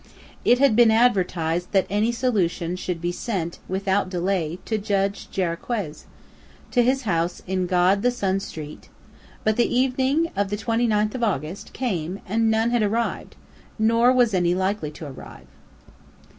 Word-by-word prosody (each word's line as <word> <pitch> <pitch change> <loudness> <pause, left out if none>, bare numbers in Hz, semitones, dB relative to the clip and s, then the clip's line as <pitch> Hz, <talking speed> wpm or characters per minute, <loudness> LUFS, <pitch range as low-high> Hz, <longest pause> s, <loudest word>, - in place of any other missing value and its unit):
It 245 - +5
had 275 -4 +4
been 235 0 +6
advertised 180 -7 +1
that 195 -1 +3
any 210 +3 +1
solution 185 -8 0
should 180 -2 -4
be 175 0 -1
sent, 175 -3 -4
without 190 0 0
delay, 180 -2 -1
to 220 -1 -1
Judge 200 -1 -1
Jarriquez, 175 -1 -3 0.7
to 245 - +4
his 260 +2 +1
house 170 -4 -1
in 185 -1 -1
God 185 +2 +3
the 245 - +3
Son 195 -6 -1
Street; 155 -6 -9 0.5
but 215 0 +1
the 240 - +2
evening 265 +5 +1
of 200 0 0
the 205 - -2
29th 220 -2 +1
of 250 - -3
August 175 -3 -2
came 190 -7 -3
and 225 +3 +1
none 220 +1 +2
had 240 -1 +2
arrived, 225 +3 -1 0.4
nor 230 +2 +4
was 245 -4 +3
any 175 -1 +2
likely 190 -4 -1
to 150 +1 -9
arrive. 70 - -11
200 Hz, 155 wpm, -23 LUFS, 180-230 Hz, 0.7 s, been